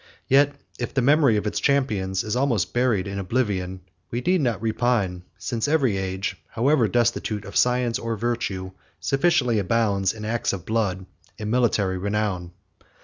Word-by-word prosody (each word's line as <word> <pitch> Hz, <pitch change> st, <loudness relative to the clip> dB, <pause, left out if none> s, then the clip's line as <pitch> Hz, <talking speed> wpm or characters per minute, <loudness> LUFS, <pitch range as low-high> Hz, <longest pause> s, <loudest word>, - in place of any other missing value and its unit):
Yet 140 Hz, +1 st, +4 dB, 0.2 s
if 120 Hz, -, -4 dB
the 130 Hz, -, +2 dB
memory 140 Hz, -4 st, +4 dB
of 105 Hz, -, -2 dB
its 105 Hz, -, -1 dB
champions 105 Hz, -10 st, +1 dB
is 105 Hz, +1 st, -2 dB
almost 125 Hz, -8 st, +1 dB
buried 120 Hz, -6 st, +2 dB
in 100 Hz, 0 st, -4 dB
oblivion, 95 Hz, -3 st, -1 dB, 0.3 s
we 120 Hz, -, -2 dB
need 180 Hz, +4 st, +2 dB
not 120 Hz, -5 st, 0 dB
repine; 110 Hz, -5 st, 0 dB, 0.2 s
since 115 Hz, +5 st, -2 dB
every 140 Hz, -8 st, +2 dB
age, 95 Hz, 0 st, -3 dB
however 125 Hz, 0 st, +2 dB
destitute 115 Hz, -2 st, 0 dB
of 100 Hz, -, -9 dB
science 125 Hz, -1 st, +2 dB
or 115 Hz, -1 st, -3 dB
virtue, 100 Hz, -5 st, -2 dB, 0.3 s
sufficiently 135 Hz, -6 st, +2 dB
abounds 100 Hz, -1 st, +1 dB
with 105 Hz, -1 st, -7 dB
acts 115 Hz, 0 st, -1 dB
of 90 Hz, -3 st, -6 dB
blood 100 Hz, -4 st, -1 dB, 0.3 s
and 105 Hz, 0 st, -4 dB
military 105 Hz, -6 st, +1 dB
renown. 100 Hz, -3 st, -2 dB
110 Hz, 155 wpm, -24 LUFS, 100-125 Hz, 0.3 s, Yet